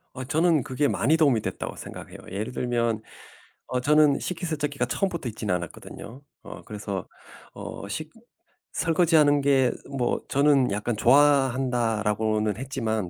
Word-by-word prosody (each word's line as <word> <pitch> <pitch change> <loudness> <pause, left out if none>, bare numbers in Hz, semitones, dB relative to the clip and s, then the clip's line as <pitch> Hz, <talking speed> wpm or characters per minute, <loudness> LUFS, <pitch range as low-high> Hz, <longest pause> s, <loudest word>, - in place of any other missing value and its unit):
어 130 - -5
저는 160 +2 +2
그게 140 +4 0
많이 155 +6 +2
도움이 140 -8 +3
됐다고 - - -5
생각해요. - - -9
예를 105 +5 -3
들면 120 -3 0 0.7
어 125 0 -1
저는 150 +1 +4
식기세척기가 155 -7 -2
처음부터 170 -1 -2
있진 110 -2 -4
않았거든요. 90 - -6 0.2
어 - - -10
그래서 100 -3 -5 0.5
어 100 - -7
식 155 +9 -5 0.6
설거지하는 155 -3 +3
게 135 -2 +3 0.2
뭐 125 -2 0
저는 140 -3 +3
약간 105 +3 -2
"좋아한다."라고는 115 -6 +2
했지만 115 -7 -2
130 Hz, 310 characters per minute, -25 LUFS, 110-145 Hz, 0.7 s, 저는